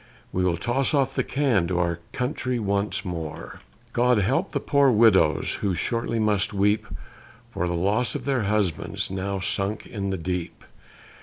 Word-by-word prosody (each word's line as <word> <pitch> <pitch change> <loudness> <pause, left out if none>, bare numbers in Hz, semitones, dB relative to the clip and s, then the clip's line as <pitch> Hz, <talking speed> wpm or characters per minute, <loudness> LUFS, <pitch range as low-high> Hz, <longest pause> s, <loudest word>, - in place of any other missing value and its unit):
We 90 - 0
will 90 -2 +1
toss 130 - 0
off 135 -1 +1
the - - 0
can 130 -11 +1
to 90 0 -1
our 85 -1 0
country 125 -1 -2
once 100 -1 -1
more. 80 -4 -6 0.3
God 125 0 +3
help 130 - +1
the - - -1
poor 140 -1 +3
widows, 105 - +4
who 95 -3 0
shortly 115 +4 -1
must 105 -1 +1
weep 105 +2 +2 0.6
For 90 - -2
the 85 - -1
loss 105 +8 +1
of - - -4
their 135 -6 0
husbands, 100 -5 -1
now 95 +1 -2
sunk 100 +2 -1
in 100 -3 -4
the 95 - -1
deep! 90 0 -4
100 Hz, 165 wpm, -25 LUFS, 90-120 Hz, 0.6 s, widows